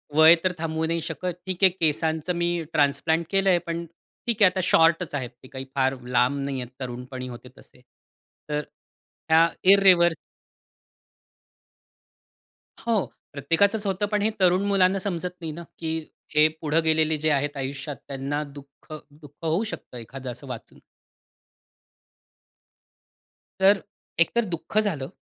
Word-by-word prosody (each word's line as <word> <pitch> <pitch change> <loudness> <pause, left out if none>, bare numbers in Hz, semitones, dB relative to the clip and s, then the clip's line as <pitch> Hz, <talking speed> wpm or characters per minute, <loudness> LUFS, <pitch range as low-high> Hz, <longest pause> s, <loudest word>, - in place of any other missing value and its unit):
वय 160 +2 +9
तर 185 - +2
थांबवू 160 0 -1
नाही 165 +1 -1
शकत. 160 +3 -5 0.2
ठीक 185 0 -4
आहे 190 - +9
केसांचं 160 0 0
मी 175 0 0
ट्रान्सप्लांट 160 +3 +2
केलंय 195 -2 +3
पण 170 0 -3 0.4
ठीक 230 -2 -1
आहे 185 - +8
आता 185 - -3
शॉर्टच 165 -2 +3
आहेत 130 -4 -3
ते - - -12
काही 135 -1 -7
फार 135 0 +2
लांब 125 +2 +2
नाहीये 135 -2 -3
तरुणपणी 125 0 -6
होते 125 0 -10
तसे. 125 - -19 0.7
तर 150 0 0 0.7
ह्या 160 +1 +6 0.2
इररिवर 185 -4 +6 2.7
हो 225 -4 0 0.3
प्रत्येकाचंच 180 +10 +1
होतं 195 +1 0
पण 210 -1 +1
हे 215 - +2
तरुण 185 +1 +4
मुलांना 195 -1 +3
समजत 180 -2 -3
नाही 160 -1 -4
ना 170 +3 -8 0.2
की 160 -1 -2 0.4
हे 150 +1 +7
पुढं 160 +1 +2
गेलेले 160 -1 +2
जे 155 +1 0
आहेत 145 0 0
आयुष्यात 140 +2 -4
त्यांना 140 +2 -3
दुःख, 140 0 -14 0.2
दुःख 145 -1 -16
होऊ 165 +6 +1
शकतं 205 - -7
एखादं 125 +2 -7
असं 125 +4 -11
वाचून. 125 -3 -9 2.8
तर 195 +1 +6 0.4
एकतर 230 +7 +3
दुःख 175 +2 -5
झालं 155 -11 -1
160 Hz, 135 wpm, -25 LUFS, 140-185 Hz, 2.8 s, वय